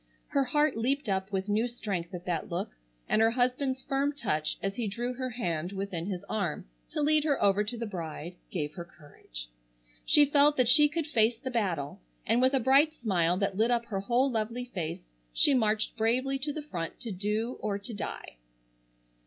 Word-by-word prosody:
Her 275 Hz, -1 st, +2 dB
heart 295 Hz, +3 st, +2 dB
leaped 265 Hz, +4 st, 0 dB
up 190 Hz, 0 st, -1 dB
with 190 Hz, 0 st, -2 dB
new 215 Hz, +3 st, +1 dB
strength 200 Hz, -8 st, -4 dB
at 175 Hz, +1 st, -8 dB
that 170 Hz, -3 st, -2 dB
look, 180 Hz, +4 st, -3 dB, 0.4 s
and 215 Hz, -, +2 dB
her 225 Hz, -, +5 dB
husband's 255 Hz, +2 st, 0 dB
firm 280 Hz, +1 st, 0 dB
touch 155 Hz, -, -1 dB
as 195 Hz, 0 st, -3 dB
he 230 Hz, -1 st, -2 dB
drew 240 Hz, +5 st, -3 dB
her 255 Hz, +1 st, -4 dB
hand 175 Hz, -7 st, -3 dB
within 190 Hz, -3 st, -4 dB
his 190 Hz, -2 st, -4 dB
arm 195 Hz, -8 st, -2 dB, 0.2 s
to 300 Hz, -, -2 dB
lead 305 Hz, 0 st, +3 dB
her 295 Hz, -3 st, +1 dB
over 200 Hz, +1 st, +3 dB
to 230 Hz, +3 st, -4 dB
the 230 Hz, -, -3 dB
bride 170 Hz, -3 st, -6 dB
gave 150 Hz, -5 st, -3 dB
her 175 Hz, -, -6 dB
courage. 145 Hz, -, -11 dB, 0.6 s
She 295 Hz, -, +6 dB
felt 290 Hz, +1 st, +4 dB
that 255 Hz, -2 st, +3 dB
she 295 Hz, +5 st, +7 dB
could 325 Hz, +1 st, -2 dB
face 230 Hz, -5 st, +2 dB
the 260 Hz, -, -5 dB
battle, 175 Hz, -, -2 dB, 0.2 s
and 240 Hz, -, +2 dB
with 260 Hz, +2 st, +4 dB
a -, -, +4 dB
bright 270 Hz, +5 st, +5 dB
smile 180 Hz, -, +1 dB
that 195 Hz, -1 st, -1 dB
lit 225 Hz, +2 st, +3 dB
up 235 Hz, -1 st, +1 dB
her 195 Hz, -3 st, -1 dB
whole 245 Hz, +7 st, +2 dB
lovely 230 Hz, +2 st, -2 dB
face 175 Hz, -, -5 dB, 0.3 s
she 280 Hz, -, +5 dB
marched 215 Hz, -4 st, +1 dB
bravely 255 Hz, +5 st, +1 dB
to 295 Hz, +2 st, -2 dB
the 300 Hz, +1 st, -5 dB
front 170 Hz, -, -5 dB
to 230 Hz, -, -4 dB
do 210 Hz, +6 st, -2 dB
or 205 Hz, -2 st, -2 dB
to 200 Hz, +3 st, -7 dB
die. 200 Hz, -, -6 dB
225 Hz, 200 wpm, -29 LUFS, 190-260 Hz, 0.6 s, she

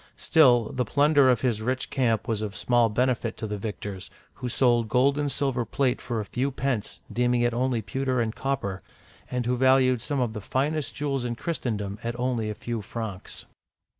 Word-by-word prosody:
Still, 125 Hz, -8 st, +4 dB
the 125 Hz, -, 0 dB
plunder 145 Hz, -1 st, +4 dB
of 120 Hz, -3 st, +3 dB
his 120 Hz, -5 st, 0 dB
rich 130 Hz, +3 st, -2 dB
camp 120 Hz, -5 st, +1 dB
was 110 Hz, -3 st, -1 dB
of 105 Hz, -2 st, -4 dB
small 120 Hz, +1 st, +3 dB
benefit 120 Hz, 0 st, 0 dB
to -, -, -4 dB
the 105 Hz, -1 st, -4 dB
victors, 100 Hz, -2 st, -6 dB, 0.2 s
who 125 Hz, -, -5 dB
sold 120 Hz, -3 st, +2 dB
gold 130 Hz, +4 st, +3 dB
and 145 Hz, -1 st, 0 dB
silver 135 Hz, -4 st, 0 dB
plate 125 Hz, +3 st, 0 dB
for 115 Hz, -2 st, -3 dB
a 105 Hz, -, -3 dB
few 125 Hz, +7 st, -1 dB
pence, 125 Hz, -8 st, -3 dB
— -, -, -13 dB
deeming 120 Hz, +1 st, +2 dB
it 120 Hz, 0 st, +2 dB
only 120 Hz, -2 st, 0 dB
pewter 130 Hz, +5 st, -1 dB
and 110 Hz, -2 st, 0 dB
copper, 130 Hz, -9 st, -2 dB, 0.2 s
— -, -, -26 dB
and 125 Hz, -1 st, -2 dB
who 125 Hz, +1 st, +1 dB
valued 130 Hz, -1 st, +4 dB
some 140 Hz, +2 st, -2 dB
of 120 Hz, -3 st, 0 dB
the 105 Hz, -, -5 dB
finest 145 Hz, +7 st, -1 dB
jewels 140 Hz, -2 st, -1 dB
in 120 Hz, -1 st, -2 dB
Christendom 110 Hz, -, -3 dB
at 120 Hz, +1 st, -4 dB
only 120 Hz, -3 st, 0 dB
a 105 Hz, -, -4 dB
few 120 Hz, 0 st, -4 dB
francs. 105 Hz, -2 st, -6 dB
120 Hz, 200 wpm, -26 LUFS, 110-130 Hz, 0.2 s, Still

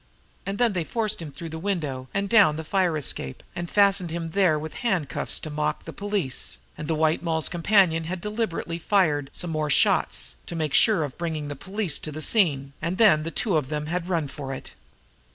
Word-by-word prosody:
And 195 Hz, +1 st, -2 dB
then 235 Hz, -2 st, +3 dB
they 175 Hz, -3 st, 0 dB
forced 215 Hz, +1 st, -2 dB
him 155 Hz, -3 st, -7 dB
through 165 Hz, +3 st, -8 dB
the 160 Hz, 0 st, -6 dB
window 155 Hz, -9 st, -2 dB
and 200 Hz, 0 st, -1 dB
down 200 Hz, -8 st, +5 dB
the 160 Hz, -, -5 dB
fire 180 Hz, -1 st, +1 dB
escape, 70 Hz, -, -3 dB
and 175 Hz, -1 st, -4 dB
fastened 200 Hz, -3 st, +3 dB
him 165 Hz, 0 st, -4 dB
there 180 Hz, -4 st, +3 dB
with 155 Hz, +1 st, -6 dB
handcuffs 175 Hz, -, 0 dB
to 155 Hz, -, -6 dB
mock 150 Hz, 0 st, -2 dB
the -, -, -7 dB
police, 200 Hz, -10 st, -1 dB, 0.2 s
and 150 Hz, -, -6 dB
the 160 Hz, -, +1 dB
White 155 Hz, +1 st, +2 dB
Moll's 160 Hz, -2 st, 0 dB
companion 175 Hz, -2 st, +3 dB
had 180 Hz, +3 st, -4 dB
deliberately 210 Hz, -5 st, -3 dB
fired 160 Hz, -7 st, +2 dB
some 175 Hz, -, -4 dB
more 155 Hz, -1 st, -1 dB
shots -, -, +2 dB
to 170 Hz, -, -5 dB
make 155 Hz, -4 st, -2 dB
sure 205 Hz, -4 st, +5 dB
of 145 Hz, 0 st, -6 dB
bringing 160 Hz, -4 st, -3 dB
the 145 Hz, -, -4 dB
police 190 Hz, +1 st, -1 dB
to 155 Hz, -, -5 dB
the 155 Hz, -, -6 dB
scene, 145 Hz, -, +2 dB
and 170 Hz, +4 st, -2 dB
then 200 Hz, -9 st, +6 dB
the 160 Hz, -, -3 dB
two 195 Hz, +2 st, 0 dB
of 140 Hz, -4 st, -2 dB
them 150 Hz, -1 st, -2 dB
had 175 Hz, +3 st, -3 dB
run 165 Hz, -5 st, 0 dB
for 135 Hz, -1 st, -7 dB
it. -, -, -10 dB
165 Hz, 210 wpm, -25 LUFS, 150-195 Hz, 0.2 s, then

